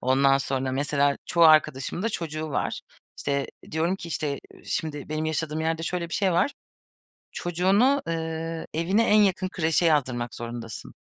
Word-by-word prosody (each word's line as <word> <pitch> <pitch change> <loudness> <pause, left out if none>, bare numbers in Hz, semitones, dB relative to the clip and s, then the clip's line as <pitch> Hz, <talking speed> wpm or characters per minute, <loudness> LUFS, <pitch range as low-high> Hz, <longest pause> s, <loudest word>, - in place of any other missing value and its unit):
Ondan 135 +2 +4
sonra 135 -1 -2
mesela 140 0 +1
çoğu 170 -1 +4
arkadaşımın 155 +1 +4
da 225 - +1
çocuğu 155 -5 -4
var. - - -2 0.4
İşte, 140 -1 -1 0.2
diyorum 165 +4 0
ki, 170 - -8
işte, 155 -2 -2 0.2
eee, - - -18
şimdi 150 -3 -3
benim 155 +1 -2
yaşadığım 155 0 -2
yerde 160 0 -1
şöyle 170 0 -2
bir - - -5
şey 190 -3 +2
var. 275 +11 +2 0.8
Çocuğunu, 195 +11 +2
eee, 165 0 -3
evine 185 +8 +2
en 210 0 +6
yakın 185 -2 +2
kreşe 165 -1 +1
yazdırmak 125 -7 +1
zorundasın. 115 -3 -7
160 Hz, 155 wpm, -26 LUFS, 140-175 Hz, 0.8 s, en